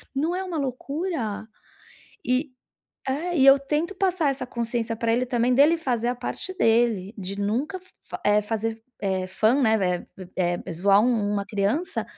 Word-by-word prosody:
não 315 +6 0
é 375 - -2
uma 360 -3 -4
loucura? 275 - -3 0.8
E 255 +3 0 0.6
é, 325 +6 -1
e 270 - +5
eu 275 0 +9
tento 300 +7 -2
passar 370 -6 +1
essa 270 -1 -3
consciência 235 -1 -2
pra 230 0 0
ele 250 +2 +2
também 245 0 +1
dele 295 +6 +5
fazer 240 -6 -1
a 245 - 0
parte 250 +9 -5
dele, 225 - +2
de 195 0 -5
nunca 250 - -1
f 370 - -24 0.2
fa - - -5
eh, 210 0 +4
fazer 225 +1 -3 0.2
é 190 -2 -1
fun, 230 +8 +2
né. 220 -2 +4 0.4
Eh 190 - -8
eh 175 -1 +1
eh, - - -4
zoar 195 +4 +4
um 220 -3 +1
uma 200 -1 -1
criança 215 - -1
240 Hz, 175 wpm, -25 LUFS, 210-285 Hz, 0.8 s, eu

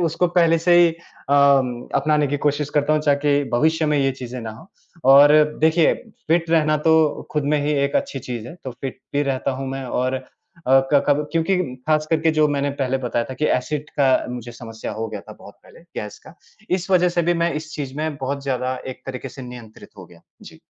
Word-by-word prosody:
उसको 180 +3 0
पहले 165 -1 +4
से 175 +1 +3
ही 170 -1 +6
अ, - - -9 0.4
अपनाने 140 +2 +2
की 145 +1 -1
कोशिश 145 0 0
करता 150 +1 +2
हूँ, 155 - +1
ताकी 145 0 +2
भविष्य 155 +6 +1
में 150 -1 +1
यह 135 -1 +2
चीज़ें 125 0 -6
ना 115 - -6
हों 115 +11 -14 0.5
और 145 +2 +8 0.3
देखिए 160 +1 +4 0.4
फ़िट 165 0 +1
रहना 155 -2 +3
तो 160 -2 +2
खुद 150 -2 -1
में - - +2
ही 150 - 0
एक 140 - 0
अच्छी 280 0 -2
चीज़ 120 -2 -6
है - - -10
तो 130 - -4
फ़िट 135 -2 -5 0.2
भी 145 - +2
रहता 135 -1 -1
हूँ 135 - -4
मैं 135 -1 -5
और 130 +1 -1
अ, 130 0 -5 0.7
क 140 - +5
कब 145 +1 +2
क्योंकि 165 +3 +1 0.3
ख़ास 155 0 +2
करके 160 0 +2
जो 150 - +5
मैंने 140 0 -1
पहले 135 0 0
बताया 120 -2 -2
था 130 - -8
कि 155 - -1
एसिड 150 +3 -5
का 135 -1 +4 0.2
मुझे 120 -1 -7
समस्या 115 -2 -8
हो 115 +1 -4
गया 105 -2 -6
था 110 - -12
बहुत 100 - -14
पहले, - - -17 0.2
गैस 105 -1 -8
का, - - -13 0.4
इस 185 +1 -1
वज़ह 180 -1 +4
से 175 0 0
भी 175 +1 +1
मैं 170 - 0
इस 155 +1 -6
चीज़ 140 -3 -5
में 155 -1 -3
बहुत 140 +1 -4
ज़्यादा 130 -1 -2
एक 130 - -8
तरीके 130 0 -6
से 135 +1 -11
नियंत्रित 120 -3 -11
हो - - -10
गया। - - -19 0.2
जी। - - -14
145 Hz, 220 wpm, -21 LUFS, 130-155 Hz, 0.7 s, और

